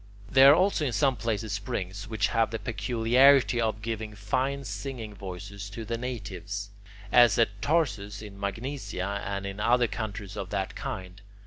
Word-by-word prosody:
There 135 +1 +8
are - - +7
also 185 -2 +2
in 130 -5 -1
some 130 +5 +3
places 110 -2 -2
springs 100 0 -4
which 110 -5 0
have 115 -1 +2
the 115 - -3
peculiarity 120 +3 +3
of 110 -1 -1
giving 110 -2 -4
fine 130 +7 -1
singing 110 0 -5
voices 100 +1 -7
to 110 +3 -7
the 115 +2 -2
natives, 105 -4 -5 0.4
as 120 -4 +6
at 100 -3 +1
Tarsus 105 -10 0
in 100 -2 -10
Magnesia 100 -2 -3
and 100 -1 -3
in 100 +1 -5
other 120 +3 +3
countries 105 -2 -5
of 100 -3 -5
that 95 0 -2
kind. 95 +1 -6
110 Hz, 160 wpm, -28 LUFS, 100-120 Hz, 0.4 s, There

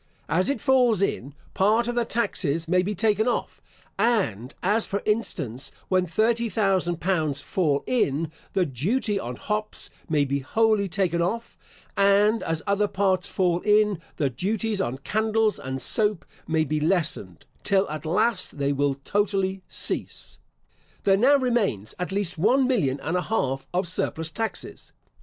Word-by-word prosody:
As 185 +7 +2
it 280 - 0
falls 250 -7 +3
in, 140 -7 -2 0.2
part 220 +5 +2
of 240 - -1
the 240 -1 0
taxes 165 -9 -1
may 180 +2 +3
be 205 +3 -2
taken 215 +2 +2
off; 245 - -2 0.4
and 140 - +1
as, 210 +4 +2
for 200 - -3
instance, 155 - -1 0.2
when 185 -1 +2
thirty 225 +7 +1
thousand 190 -4 +1
pounds 160 -7 0
fall 145 -3 0
in, 160 - 0 0.2
the 190 -2 +2
duty 195 - -1
on 125 -6 -5
hops 210 - -2 0.2
may 150 -3 +2
be 140 +1 -1
wholly 215 +7 +1
taken 175 -1 0
off; 225 +7 -2 0.4
and 205 +2 +4
as 165 -1 -2
other 200 +1 +2
parts 190 -2 +1
fall 175 -3 +1
in, 210 -3 +3 0.2
the 145 - +1
duties 205 - -1
on 125 -4 -2
candles 220 +7 0
and 130 0 -4
soap 210 - +1 0.2
may 160 -1 +2
be 155 0 -1
lessened, 155 - -1 0.2
till 195 -1 +2
at 155 0 -6
last 180 +3 0
they 140 0 0
will 140 0 +1
totally 195 +4 -1
cease. - - -4 0.6
There 195 - +4
now 260 +8 +5
remains 230 - 0
at 180 +1 -3
least 190 -4 -1
one 250 +9 +4
million 160 - +1
and 165 - -2
a 180 - +1
half 135 -11 -1
of 180 +1 0
surplus 165 -2 -1
taxes. 225 +5 -5
190 Hz, 155 wpm, -25 LUFS, 155-215 Hz, 0.6 s, now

